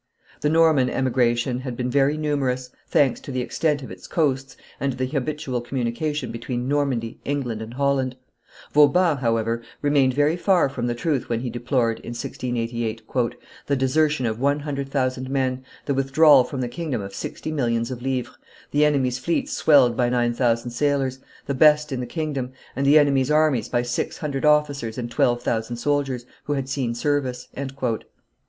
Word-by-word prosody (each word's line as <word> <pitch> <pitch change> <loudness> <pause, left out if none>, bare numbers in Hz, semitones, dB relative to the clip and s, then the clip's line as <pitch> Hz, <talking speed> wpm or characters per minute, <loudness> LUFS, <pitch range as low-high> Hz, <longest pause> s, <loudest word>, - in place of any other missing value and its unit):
The 150 - +1
Norman 155 -5 +4
emigration 125 -1 +1
had 130 -2 -6
been 125 0 -2
very 140 +3 +3
numerous, 135 -4 -1 0.2
thanks 135 -4 +2
to - - -8
the 130 -1 -1
extent 145 +3 0
of - - -8
its - - -10
coasts 135 -5 -1 0.2
and 140 0 0
to - - -10
the 130 - 0
habitual 135 -2 -2
communication 130 +5 -2
between 120 +1 -4
Normandy, 135 -5 -1
England, 130 -6 -2
and 110 +2 -8
Holland; 135 -2 +1 0.6
Vauban, 150 +2 +5
however, 115 -2 0 0.2
remained 140 -3 +3
very 145 +3 +3
far 180 -4 +3
from 125 -3 -3
the 120 - -1
truth 140 +1 -1
when 115 -1 -1
he 125 -2 -3
deplored, 120 -1 0
in 120 - -7
1688, 115 -2 -3 0.6
"the 140 - +2
desertion 140 +1 +1
of 110 0 -2
one 140 +2 +1
hundred 140 -2 -4
thousand 130 -1 -1
men, 130 -1 -1 0.2
the 140 - 0
withdrawal 135 +1 +5
from 130 +1 -5
the 125 - -1
kingdom 145 -1 -3
of 100 0 -8
sixty 155 +9 -5
millions 115 -4 0
of 125 -1 -6
livres, 130 -1 -2 0.4
the 145 +1 +3
enemy's 130 -4 +2
fleets 170 +5 -1
swelled 135 -6 +5
by 120 0 +2
nine 120 -1 +1
thousand 120 -1 0
sailors, 135 0 0 0.3
the 140 - -2
best 150 +2 +4
in 130 - -2
the 125 - -4
kingdom, 145 -6 -3 0.2
and 140 0 0
the 145 +2 +7
enemy's 140 -3 +3
armies 150 -5 +2
by 120 -1 +1
six 120 0 -2
hundred 145 -2 -3
officers 145 -6 +2
and 120 -1 -4
twelve 120 0 +1
thousand 115 +1 -1
soldiers, 135 -1 -1 0.2
who 145 - -1
had 135 -2 -2
seen 130 -4 -2
service." 130 -2 -1
130 Hz, 175 wpm, -23 LUFS, 120-145 Hz, 0.6 s, the